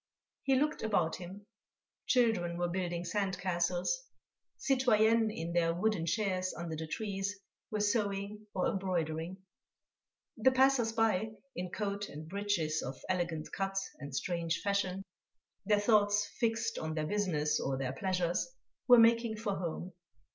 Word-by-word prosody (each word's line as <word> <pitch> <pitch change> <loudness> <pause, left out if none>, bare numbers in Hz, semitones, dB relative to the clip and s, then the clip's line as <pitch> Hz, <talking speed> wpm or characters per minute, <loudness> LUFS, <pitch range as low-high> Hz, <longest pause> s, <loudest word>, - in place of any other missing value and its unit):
He 270 -1 +2
looked 300 +3 +1
about 180 -7 +1
him. 190 +3 -9 0.6
Children 220 -9 +2
were 175 0 0
building 175 -1 -2
sand 190 +1 -1
castles. 180 - 0 0.6
Citoyennes 230 -4 +3
in 170 -3 -4
their 165 -1 +2
wooden 185 -3 0
chairs 185 -2 0
under 170 -2 -4
the 160 +1 -5
trees 200 +2 -3 0.3
were 210 -1 -1
sewing 205 0 -1
or 185 - +1
embroidering. 175 -2 -2 1.0
The 255 +4 +4
passers 260 -3 +4
by, 220 -2 +1 0.2
in 180 0 -3
coat 200 +1 -3
and 155 +2 -8
breeches 180 -5 0
of 130 +1 -6
elegant 170 -4 -1
cut 195 0 -2 0.2
and 140 -1 -7
strange 170 +3 -1
fashion, 195 -1 0 0.6
their 210 -1 +4
thoughts 205 -1 +4
fixed 225 -1 0
on 155 0 -3
their 155 -1 -1
business 155 -6 +1
or 135 -1 -1
their 130 -1 -2
pleasures, 180 - 0 0.4
were 245 -1 +9
making 230 -1 +5
for 210 -2 -2
home. 175 +1 -4
195 Hz, 140 wpm, -33 LUFS, 170-215 Hz, 1.0 s, were